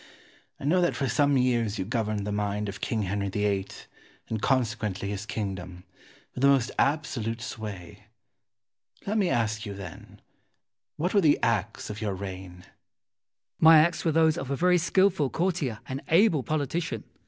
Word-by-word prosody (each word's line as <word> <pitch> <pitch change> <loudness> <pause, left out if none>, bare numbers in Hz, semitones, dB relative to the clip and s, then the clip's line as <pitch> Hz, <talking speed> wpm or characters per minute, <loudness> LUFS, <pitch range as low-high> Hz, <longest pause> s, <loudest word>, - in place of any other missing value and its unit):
I - - -10
know 180 +5 +3
that 175 - +1
for 135 - -1
some 140 +3 +2
years 120 -4 +1
you 95 - -2
governed 110 -2 -2
the 105 - -3
mind 105 0 -2
of 100 0 -7
King 110 -2 -1
Henry 100 +1 -2
VIII., 100 -1 0 0.6
and 110 -2 -3
consequently 110 -6 0
his 105 +1 -5
kingdom, 95 -5 -5 0.5
with 125 - -6
the 140 - +5
most 135 -3 +3
absolute 135 -6 0
sway. 100 -3 -8 1.0
Let 215 +2 0
me 190 -4 +2
ask 110 -5 0
you, 100 -2 -6
then, 95 -5 -10 0.8
What 175 +5 -1
were 200 - +5
the 150 -4 +4
acts 110 -1 -1
of 105 - -7
your 105 -3 -2
reign? 95 -1 -7
Wolsey. 90 - -20 0.9
My 160 0 +8
acts 165 +3 +3
were 165 - +2
those 160 0 +3
of 135 - -6
a 140 - 0
very 180 +4 +3
skilful 185 -4 +2
courtier 160 - -1
and 130 +1 -4
able 165 -3 +4
politician. 150 -2 -2
115 Hz, 165 wpm, -27 LUFS, 100-155 Hz, 1.0 s, My